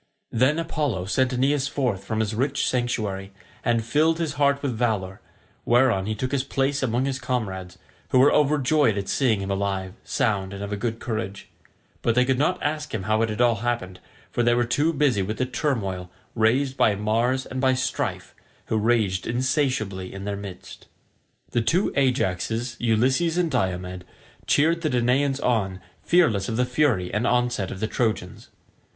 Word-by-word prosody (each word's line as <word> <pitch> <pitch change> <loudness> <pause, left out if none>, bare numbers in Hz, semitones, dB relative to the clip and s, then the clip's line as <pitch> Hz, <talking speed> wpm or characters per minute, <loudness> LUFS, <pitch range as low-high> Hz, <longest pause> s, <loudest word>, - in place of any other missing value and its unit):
Then 130 +7 +2
Apollo 150 - -1
sent 125 +7 +1
Aeneas 135 +2 +1
forth 125 -9 -1
from 110 +2 -2
his 110 0 -1
rich 135 +5 0
sanctuary, 105 -6 -2 0.3
and 115 -2 +1
filled 160 +6 +2
his 165 -3 -2
heart 140 0 +2
with 130 -4 -1
valour, 105 -5 -1 0.4
whereon 120 -5 +3
he 110 - -1
took 130 +4 -3
his 140 -2 0
place 140 +1 0
among 125 0 0
his 135 -1 -2
comrades, 95 -8 -3 0.3
who - - +3
were 135 +3 +6
overjoyed 145 -5 +3
at 100 -1 -3
seeing 115 -7 +1
him 100 0 -3
alive, 95 -1 -2
sound, 100 -4 -1
and 100 - -6
of 100 +1 -4
a - - 0
good 115 +2 -3
courage; 110 -4 -4 0.5
but 115 - +1
they 125 0 +4
could 130 0 +1
not 180 +5 +1
ask 150 -2 -2
him 100 - -3
how 110 +2 +1
it 115 - +1
had 110 +2 -2
all 120 -2 +4
happened, 105 -5 -3 0.3
for - - 0
they 120 0 +3
were 120 0 +2
too 145 +7 +1
busy 140 -9 +2
with 105 +3 -3
the 130 - 0
turmoil 110 - -2 0.2
raised 130 +5 +2
by 105 - +3
Mars 115 +5 0
and 130 0 -5
by 130 -1 +3
Strife, 130 0 -3 0.4
who 110 - +1
raged 105 -4 +1
insatiably 120 -6 -1
in 95 0 -7
their 100 0 -2
midst. 100 -3 -10 0.6
The 120 - +1
two 170 - +1
Ajaxes, 120 -2 0
Ulysses 130 +9 +2
and 175 -3 +1
Diomed, 90 -6 -2 0.4
cheered 165 +3 +3
the 155 - 0
Danaans 130 +2 +1
on, 100 -8 0 0.2
fearless 120 - +2
of 110 - -2
the 125 - +2
fury 125 -8 +1
and 105 +4 +1
onset 120 -6 +1
of 95 - -7
the 110 - 0
Trojans. 110 0 -2
120 Hz, 180 wpm, -24 LUFS, 100-135 Hz, 0.6 s, were